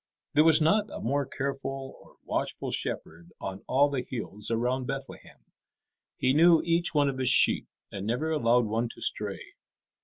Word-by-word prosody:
There 150 Hz, -, +5 dB
was 160 Hz, -1 st, +6 dB
not 205 Hz, +7 st, +2 dB
a -, -, -7 dB
more 140 Hz, +3 st, -1 dB
careful 135 Hz, 0 st, -5 dB
or -, -, -20 dB
watchful -, -, -3 dB
shepherd 85 Hz, +2 st, -4 dB
on 95 Hz, 0 st, -6 dB
all 140 Hz, +2 st, +4 dB
the 140 Hz, -3 st, -2 dB
hills 105 Hz, -4 st, -4 dB
around 125 Hz, +3 st, -1 dB
Bethlehem. 135 Hz, -1 st, -7 dB, 0.8 s
He 130 Hz, 0 st, +2 dB
knew 165 Hz, +2 st, +6 dB
each 170 Hz, 0 st, +1 dB
one 145 Hz, -1 st, +4 dB
of 135 Hz, -1 st, -3 dB
his 130 Hz, -, +2 dB
sheep, -, -, +4 dB, 0.2 s
and 100 Hz, +1 st, -5 dB
never 145 Hz, +8 st, -1 dB
allowed 125 Hz, -5 st, +3 dB
one 115 Hz, +2 st, -1 dB
to -, -, -15 dB
stray. -, -, -3 dB
135 Hz, 165 wpm, -28 LUFS, 115-150 Hz, 0.8 s, was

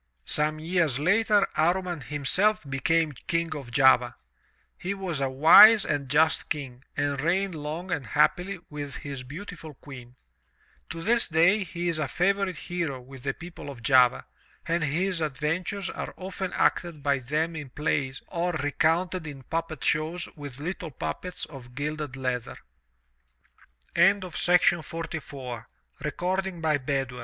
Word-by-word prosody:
Some 155 Hz, +1 st, +1 dB
years 165 Hz, -4 st, +1 dB
later, 205 Hz, +6 st, +3 dB
Amman 175 Hz, 0 st, +1 dB
himself 150 Hz, -, +1 dB
became 155 Hz, +4 st, +1 dB, 0.2 s
King 165 Hz, -1 st, 0 dB
of 140 Hz, -5 st, -7 dB
Java. 125 Hz, 0 st, +4 dB, 0.6 s
He 195 Hz, +2 st, -4 dB
was 180 Hz, -7 st, -3 dB
a 135 Hz, -, +1 dB
wise 175 Hz, +10 st, +8 dB
and 145 Hz, -3 st, -2 dB
just 160 Hz, +3 st, +3 dB
King 135 Hz, -4 st, -5 dB
and 145 Hz, -1 st, 0 dB
reigned 185 Hz, +4 st, +1 dB
long 160 Hz, +4 st, -5 dB
and 145 Hz, -9 st, -2 dB
happily 180 Hz, -, +2 dB
with 145 Hz, -2 st, -6 dB
his 140 Hz, -3 st, -6 dB
beautiful 155 Hz, +2 st, -9 dB
Queen. 125 Hz, -3 st, -12 dB, 0.7 s
To 165 Hz, 0 st, -6 dB
this 235 Hz, +4 st, +3 dB
day 170 Hz, +6 st, +4 dB
he 175 Hz, -1 st, -4 dB
is 165 Hz, -2 st, +1 dB
a 150 Hz, -, 0 dB
favorite 195 Hz, +4 st, 0 dB
hero 170 Hz, -7 st, -3 dB
with 130 Hz, +1 st, -12 dB
the 135 Hz, +1 st, -2 dB
people 165 Hz, -3 st, -9 dB
of 125 Hz, -4 st, -10 dB
Java 125 Hz, 0 st, +4 dB, 0.4 s
and 165 Hz, 0 st, +1 dB
his 170 Hz, +4 st, 0 dB
adventures 160 Hz, +7 st, -2 dB
are -, -, -6 dB
often 190 Hz, 0 st, -5 dB
acted 170 Hz, -5 st, 0 dB
by 140 Hz, -1 st, +2 dB
them 155 Hz, +6 st, -1 dB
in 150 Hz, -4 st, -6 dB
plays 135 Hz, -1 st, -2 dB
or 175 Hz, 0 st, -1 dB
recounted 160 Hz, +3 st, 0 dB
in 140 Hz, -3 st, -8 dB
puppet 165 Hz, -1 st, -4 dB
shows 160 Hz, +4 st, 0 dB
with 145 Hz, -4 st, -9 dB
little 175 Hz, +2 st, -4 dB
puppets 130 Hz, -, -4 dB
of 125 Hz, -5 st, -12 dB
gilded 150 Hz, -1 st, -4 dB
leath 125 Hz, -2 st, -2 dB
155 Hz, 130 wpm, -27 LUFS, 140-175 Hz, 0.7 s, wise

